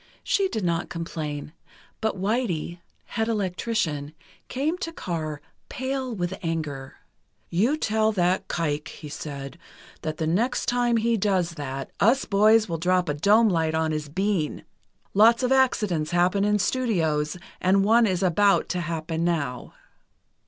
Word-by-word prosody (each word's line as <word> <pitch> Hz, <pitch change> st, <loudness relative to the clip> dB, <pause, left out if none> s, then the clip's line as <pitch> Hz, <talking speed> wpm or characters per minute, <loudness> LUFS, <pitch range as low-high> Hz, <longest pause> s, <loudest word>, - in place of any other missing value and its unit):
She 395 Hz, -1 st, +2 dB
did 215 Hz, -, -2 dB
not 170 Hz, 0 st, -1 dB
complain, 155 Hz, -3 st, -5 dB, 0.5 s
but 220 Hz, -2 st, -1 dB
"Whitey," 190 Hz, -5 st, -1 dB, 0.3 s
head 225 Hz, -1 st, -2 dB
electrician, 180 Hz, -8 st, -2 dB, 0.3 s
came 290 Hz, +6 st, -1 dB
to 330 Hz, -, -4 dB
Carr, 155 Hz, -, -4 dB, 0.3 s
pale 260 Hz, 0 st, -3 dB
with 175 Hz, -1 st, -2 dB
anger: 155 Hz, -6 st, -4 dB, 0.6 s
"You 230 Hz, -, +2 dB
tell 220 Hz, -5 st, +1 dB
that 180 Hz, -1 st, +1 dB
kike," 150 Hz, -3 st, -2 dB
he 150 Hz, -, -9 dB
said, 140 Hz, +1 st, -7 dB, 0.4 s
"that 155 Hz, 0 st, -4 dB
the 160 Hz, -, -1 dB
next 215 Hz, +11 st, 0 dB
time 240 Hz, -1 st, +2 dB
he 230 Hz, +1 st, +1 dB
does 185 Hz, -4 st, +1 dB
that, 135 Hz, -4 st, -6 dB
us 235 Hz, +8 st, +3 dB
boys 215 Hz, +2 st, +4 dB
will 165 Hz, -3 st, -3 dB
drop 180 Hz, 0 st, +1 dB
a -, -, +1 dB
dome 210 Hz, +9 st, +4 dB
light 160 Hz, -3 st, +1 dB
on 160 Hz, 0 st, +1 dB
his 155 Hz, -1 st, -3 dB
bean. 185 Hz, -1 st, -1 dB, 0.5 s
Lots 230 Hz, +5 st, +5 dB
of 250 Hz, -, +1 dB
accidents 210 Hz, -12 st, +2 dB
happen 180 Hz, +3 st, +2 dB
in 210 Hz, 0 st, +3 dB
studios, 170 Hz, -10 st, 0 dB, 0.2 s
and 195 Hz, +2 st, +3 dB
one 230 Hz, +2 st, +5 dB
is 185 Hz, -1 st, 0 dB
about 195 Hz, +3 st, +3 dB
to 180 Hz, -, -1 dB
happen 165 Hz, 0 st, -3 dB
now." 145 Hz, -8 st, -2 dB
180 Hz, 145 wpm, -25 LUFS, 160-220 Hz, 0.6 s, Lots